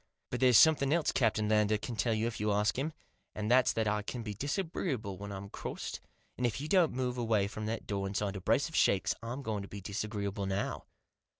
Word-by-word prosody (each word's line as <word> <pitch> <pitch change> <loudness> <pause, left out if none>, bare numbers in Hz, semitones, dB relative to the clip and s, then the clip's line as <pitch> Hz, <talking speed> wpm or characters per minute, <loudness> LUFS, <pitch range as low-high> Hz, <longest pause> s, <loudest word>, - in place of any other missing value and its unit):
But 125 - -2
there's 125 -3 +6
something 145 -4 +6
else 165 0 +2
Captain 110 -3 +1
Lander 105 0 +3
can 115 +3 -5
tell 115 +1 +1
you 110 +1 0
if 115 - -3
you 105 0 +1
ask 105 +1 +2
him, 150 +4 -1 0.4
and 105 +1 -2
that's 125 0 +5
that 110 -1 0
I 105 0 +1
can 115 +3 -5
be 105 -2 -4
disagreeable 140 - -2
when 100 0 -6
I'm 100 0 -6
crossed, - - -6 0.4
and 125 - +2
if 115 +2 -3
you 150 - -4
don't 175 -1 +4
move 125 -1 -2
away 110 -4 +2
from 105 +1 -5
that 115 +1 -3
door 100 -1 -2
inside 100 0 -2
a 95 - -5
brace 115 - +2
of 160 - -8
shakes 95 -4 +3
I'm 120 +4 -5
going 110 -4 -2
to 100 - -7
be 100 - -8
disagreeable 100 0 -3
now." 95 +1 -2
110 Hz, 225 wpm, -32 LUFS, 100-125 Hz, 0.4 s, there's